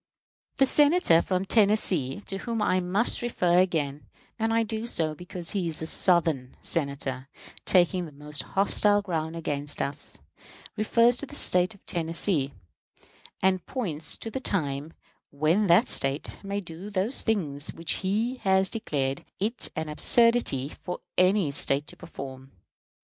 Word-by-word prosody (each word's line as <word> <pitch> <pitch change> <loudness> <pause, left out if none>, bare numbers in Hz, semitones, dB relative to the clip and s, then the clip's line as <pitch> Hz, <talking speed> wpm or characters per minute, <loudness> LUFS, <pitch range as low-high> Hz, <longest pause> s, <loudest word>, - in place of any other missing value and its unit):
The 270 - +4
Senator 290 - +4
from 185 0 -1
Tennessee, 200 - +2
to 195 -1 -5
whom 230 0 -3
I 185 -3 +2
must 190 +6 +1
refer 180 -7 +2
again 150 -6 -1 0.3
and 225 0 0
I 230 0 +3
do 220 +1 -4
so 160 -8 0
because 180 +1 -5
he 195 -5 -1
is 160 -2 -2
a - - -2
Southern 160 -7 +1
Senator 140 -4 -3 0.4
taking 180 -1 +2
the - - -12
most 150 +1 -2
hostile 205 +1 +2
ground 160 -4 -3
against 145 -3 -4
us, 140 +2 -4 0.6
refers 230 +3 +3
to 285 - -4
the 290 - -9
State 180 -4 +1
of 200 - -23
Tennessee, 165 -3 -1 0.9
and 185 -1 +2
points 165 - -3
to 225 - -5
the 265 - -3
time 155 - -2 0.4
when 160 +8 +1
that 180 +8 +5
State 135 +7 +1
may 200 +1 -3
do 175 +2 -9
those 205 +6 0
things 155 -10 -1
which 165 0 -2
he 220 +7 -1
has 190 -3 +2
declared 140 -11 -2 0.2
it 225 +5 -1
an 160 0 -3
absurdity 190 - +3
for 180 - -5
any 185 -3 +3
State 140 +1 +1
to - - -9
perform. 135 -5 -9
180 Hz, 150 wpm, -27 LUFS, 150-210 Hz, 0.9 s, that